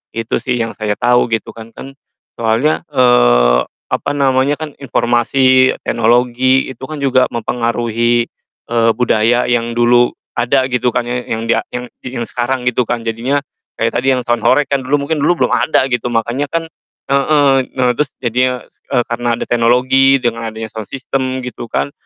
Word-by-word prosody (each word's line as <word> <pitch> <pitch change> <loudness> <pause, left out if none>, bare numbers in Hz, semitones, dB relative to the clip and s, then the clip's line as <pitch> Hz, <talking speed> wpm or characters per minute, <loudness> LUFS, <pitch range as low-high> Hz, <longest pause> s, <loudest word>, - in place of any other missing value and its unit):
Itu 115 0 -2
sih 125 - -1
yang 115 0 -2
saya 105 -1 -2
tahu 125 0 +3
gitu 115 -1 -2
kan. 115 0 -11
Kan 135 +4 -11 0.4
soalnya, 115 +7 0
eee, - - +4 0.3
apa - - -1
namanya, 140 0 +1
kan 155 -2 -6
informasi, 130 +1 +2
teknologi, 125 +3 +2
itu - - -15
kan 155 - -5
juga 130 -2 +3
mempengaruhi, 120 0 0 0.4
eee, 115 -1 +2
budaya 120 0 +2
yang 120 -1 0
dulu 120 0 +4 0.2
ada 125 +2 +1
gitu 125 -1 0
kan 120 +1 -1
ya, 125 +1 -3
yang 115 0 -2
dia 115 - +1
yang 125 0 -5 0.2
di 130 0 -7
yang 120 - -2
sekarang 125 +1 -3
gitu 125 0 +1
kan. 120 -1 -2
Jadinya, 115 +5 -1 0.4
kayak - - 0
tadi 135 - 0
yang - - -1
sound 120 -1 0
horeg, 130 +5 +3
kan 140 -1 -1
mungkin 145 +3 0
dulu 170 +4 +2
belum - - -2
ada, 145 - +2
gitu. 120 0 -1
Makanya 120 +5 -1
kan 165 0 -2 0.5
heeh, 140 0 +3 0.2
nah 125 -1 +3
terus 140 +1 -2
jadinya 125 +1 -1
e - - -6
karena 120 0 -1
ada - - -3
teknologi, 125 +3 +3
dengan 115 -1 -1
adanya 110 0 -7
sound 110 -2 -6
system 130 -1 -3
gitu 120 -1 -7
kan. 70 +1 -2
125 Hz, 170 wpm, -15 LUFS, 115-130 Hz, 0.5 s, eee